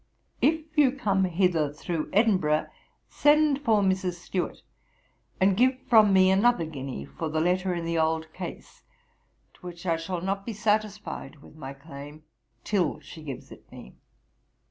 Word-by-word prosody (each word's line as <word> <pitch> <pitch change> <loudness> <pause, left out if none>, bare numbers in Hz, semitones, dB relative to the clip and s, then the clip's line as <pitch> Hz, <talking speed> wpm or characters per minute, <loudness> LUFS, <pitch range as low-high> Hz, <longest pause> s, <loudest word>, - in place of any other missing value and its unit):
'If 315 0 +2
you 285 -4 +4
come 200 -8 +1
hither 170 -4 +1
through 155 +1 -4
Edinburgh, 185 -8 +2 0.4
send 295 -1 +3
for 220 -6 +3
Mrs. 190 -1 +1
Stewart, 175 +1 -4 0.8
and 190 0 +4
give 255 +4 +3
from 215 -3 +6
me 190 0 +5
another 200 -1 +3
guinea 135 - -6
for 70 - -5
the 155 +1 -1
letter 180 +2 +1
in 170 -1 -4
the 165 0 0
old 160 0 0
case, 180 -2 -8 0.7
to - - -25
which 175 0 -9
I 165 -2 +1
shall 170 +2 -4
not 195 +2 -2
be 230 - -5
satisfied 210 -8 -2
with - - -16
my 140 -3 -7
claim, 145 +1 -11 0.4
till 180 -7 0
she 155 +2 -12
gives 140 -5 -8
it - - -15
me. 60 - -12
180 Hz, 155 wpm, -27 LUFS, 155-205 Hz, 0.8 s, from